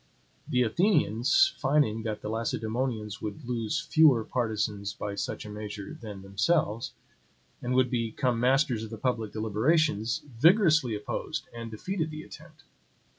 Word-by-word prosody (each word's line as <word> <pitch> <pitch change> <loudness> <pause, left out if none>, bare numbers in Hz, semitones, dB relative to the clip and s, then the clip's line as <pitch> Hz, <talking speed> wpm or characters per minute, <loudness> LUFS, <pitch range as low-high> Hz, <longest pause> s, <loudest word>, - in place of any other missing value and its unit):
The 125 0 +3
Athenians, 160 - +3
finding 135 -6 +2
that 110 -1 -4
the - - -4
Lacedaemonians 110 -1 -2
would 110 +7 -6
lose 120 +5 -1
fewer 150 -6 +5
partisans 110 -4 -2
by 100 - -4
such 100 - -4
a - - -8
measure 105 -1 -6
than 105 -4 -9
themselves, 105 +4 0 0.7
and 125 +1 -1
would 130 -1 +3
become 120 +1 0
masters 130 -2 +2
of 110 - -6
the 110 - -7
public 115 -2 -1
deliberations, 110 +2 +1 0.2
vigorously 160 - +5
opposed 105 - -4
and 115 -1 -6
defeated 160 - -3
the 155 0 -7
attempt. - - -14
115 Hz, 135 wpm, -28 LUFS, 110-145 Hz, 0.7 s, fewer